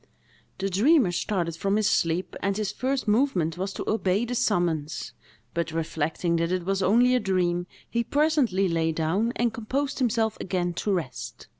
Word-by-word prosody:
The 195 - -1
dreamer 220 - +4
started 175 -2 -1
from 195 +4 0
his 215 -1 +2
sleep, 165 +2 0
and 195 +1 0
his 210 -2 -1
first 260 -1 -2
movement 210 - +2
was 190 +1 -2
to - - -6
obey 200 +1 +1
the 245 - -4
summons, 170 - 0 0.4
but, 170 -1 -2
reflecting 165 +1 -1
that 165 +1 0
it 185 -2 -1
was 195 +1 0
only 240 +6 +4
a 250 - +4
dream, 175 -3 0 0.2
he 235 0 -1
presently 280 -9 +2
lay 165 -1 +1
down, 165 +9 0
and 235 -1 0
composed 270 +7 -2
himself 225 -3 +1
again 175 -2 -1
to 205 +4 -2
rest. 170 -9 -4
195 Hz, 170 wpm, -26 LUFS, 170-230 Hz, 0.4 s, dreamer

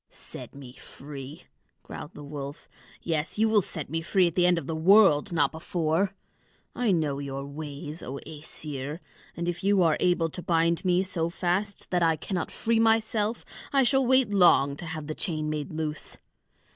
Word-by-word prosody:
"Set - - -10
me 135 -3 -10
free!" 140 +4 -10 0.4
growled 150 - -9
the 145 - -9
wolf. 145 0 -7 0.4
"Yes, 160 +1 -2
you 220 +1 +4
will 220 -1 +4
set 160 -4 -5
me 165 +3 -2
free 180 +2 +3
at 170 - 0
the 180 +1 +3
end 180 -1 +4
of 165 - -3
the 160 - -3
world, 190 -1 +5
not 165 - +2
before! 165 +3 -1 0.6
I 245 -4 +1
know 150 -6 0
your 140 -1 -5
ways, 150 +2 -7
O 130 - -6
Æsir; 150 -1 -6 0.4
and 170 0 -2
if 175 +1 -3
you 200 -2 +4
are 160 -2 +3
able 175 -2 +2
to 180 - -6
bind 170 0 +1
me 180 0 +3
so 170 -4 -1
fast 185 +4 -2
that 180 -1 +2
I 165 -1 +4
cannot 175 +2 -3
free 225 0 0
myself, 225 0 +1 0.3
I 275 -1 +4
shall 270 +2 +3
wait 260 -4 +3
long 155 -7 +5
to 170 - -7
have 160 -2 -5
the 155 - -4
chain 155 -3 -2
made 150 -2 -4
loose. 155 -1 -4
165 Hz, 185 wpm, -27 LUFS, 150-190 Hz, 0.6 s, world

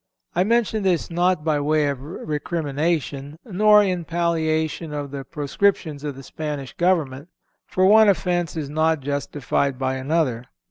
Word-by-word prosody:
I 180 - +2
mention 220 0 +1
this 180 -3 0
not 175 -1 +1
by 155 -2 +1
way 150 +1 +2
of 140 -2 -3
recrimination, 150 -1 -3
nor 210 0 +5
in 180 -3 -1
palliation 160 -2 -1
of 145 -2 -4
the 140 -1 -5
proscriptions 150 +1 -1
of 145 -2 -4
the 135 - -10
Spanish 145 -2 -5
government; 160 -6 0 0.4
for 185 - +2
one 215 +2 +7
offence 175 -4 0
is 150 -3 -3
not 155 +1 +1
justified 140 -1 -1
by 130 0 -1
another. 130 -4 0
155 Hz, 145 wpm, -23 LUFS, 145-175 Hz, 0.4 s, one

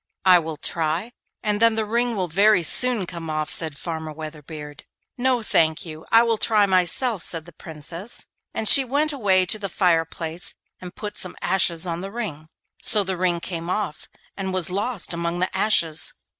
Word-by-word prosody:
'I 180 -1 +7
will 160 -2 -6
try, 165 +9 -2 0.3
and 210 -2 0
then 230 -1 +4
the 220 -1 -1
ring 235 +2 0
will 185 -3 -2
very 195 +2 +3
soon 240 +3 +3
come 170 -2 -8
off,' 155 -1 -2
said 155 -3 +4
Farmer 160 -1 -6
Weatherbeard. 150 -1 -9 0.3
'No, 250 -2 0
thank 160 -2 +1
you, 160 -1 -10
I 230 +1 +6
will 230 -2 0
try 215 -2 +4
myself,' 190 +4 +1
said 165 -2 -1
the 175 - -14
Princess, 165 +7 -4 0.3
and 220 - 0
she 275 - +10
went 290 +4 0
away 195 -8 +2
to 205 +4 +1
the 200 -2 -5
fireplace 165 -1 -1 0.2
and 180 -1 -10
put 210 -1 -7
some 185 - -1
ashes 175 -3 +1
on 170 -1 -4
the 195 +1 -7
ring. 185 -10 -6 0.3
So 210 -2 +5
the 190 -1 -3
ring 175 -1 0
came 170 -1 -6
off 185 -4 -4 0.3
and 190 -1 -4
was 185 -2 -1
lost 205 0 -1
among 170 0 -3
the 185 +1 -2
ashes. 165 -7 +1
180 Hz, 185 wpm, -22 LUFS, 165-215 Hz, 0.3 s, she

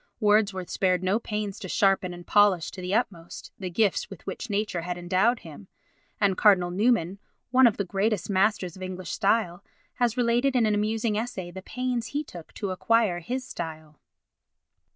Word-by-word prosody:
Wordsworth 205 -4 +2
spared 185 -1 +1
no 190 +4 +2
pains 210 -3 -4
to 190 - -7
sharpen 195 -2 +2
and 175 0 -10
polish 205 -5 +3
to 185 - -8
the 180 +2 -1
utmost 175 -8 -3
the 185 -2 -4
gifts 200 +2 +1
with 195 - -11
which 195 +5 -6
nature 205 -4 -1
had 175 +1 -4
endowed 190 +7 +1
him; 145 - -12 0.5
and 195 -2 +3
Cardinal 180 -4 +4
Newman, 200 -2 +1 0.3
one 255 0 +7
of 225 - 0
the 200 - -1
greatest 195 +2 -1
masters 195 -2 +1
of 190 - -12
English 185 -1 -5
style, 200 -3 0 0.3
has 245 -1 +1
related 245 +2 +2
in 240 -3 +4
an 215 - +2
amusing 215 +1 0
essay 200 -7 -5
the 190 +2 -8
pains 245 +2 -3
he 290 +4 -2
took 175 - -11
to 200 -3 -3
acquire 210 -1 +2
his 255 +9 -4
style." 155 -5 -7
200 Hz, 175 wpm, -26 LUFS, 180-225 Hz, 0.5 s, one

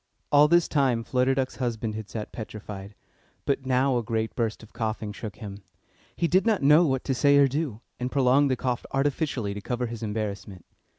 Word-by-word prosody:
All 145 +1 +7
this 170 +1 +4
time 130 -6 +1
Flutter 130 +2 +1
Duck's 130 -3 -2
husband 115 -3 -2
had 110 -1 -6
sat 110 -2 -6
petrified, 105 -2 -8 0.5
but 135 -1 -1
now 130 0 +2
a - - -4
great 110 0 -2
burst 115 -2 -2
of 110 - -16
coughing 110 -2 -3
shook 105 -1 -7
him. 100 -3 -8 0.5
He 170 - +1
did 185 +3 +3
not 220 -9 +1
know 150 +4 +7
what 130 -2 0
to 135 - 0
say 140 +2 +4
or 140 -1 +6
do, 135 -5 -3 0.2
and 125 +1 -3
prolonged 135 +1 +4
the 130 - +2
cough 125 -1 -2
artificially 135 -6 0
to 105 - -6
cover 125 +4 -2
his 115 -1 -6
embarrassment. 105 -4 -4
125 Hz, 195 wpm, -26 LUFS, 110-140 Hz, 0.5 s, All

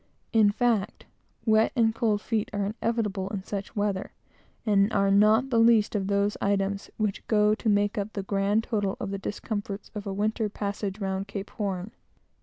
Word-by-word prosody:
In 220 -2 +6
fact, 225 -3 0 0.4
wet 220 -1 +4
and 225 -3 +3
cold 220 -3 +1
feet 220 -2 -1
are 205 -1 0 0.2
inevitable 210 -5 -1
in 200 -2 -4
such 200 0 -5
weather, 205 -2 -1 0.5
and 205 -1 +3
are 195 -1 +2
not 215 +6 +4
the 230 - +3
least 225 -2 +5
of 195 -3 -1
those 200 +1 +1
little - - +1
items 195 0 -2
which 210 -2 -2
go 210 -1 +4
to 220 +1 -1
make 205 +2 +2
up 205 +2 -4
the 200 - -3
grand 200 +2 +1
total 205 -5 -1
of 200 - -4
the 200 - -3
discomforts 205 0 -5
of 210 -1 -6
a - - -2
winter 215 +2 0
passage 200 0 -4
round 195 0 -2
the - - -15
Cape. - - -22
205 Hz, 185 wpm, -27 LUFS, 200-220 Hz, 0.5 s, In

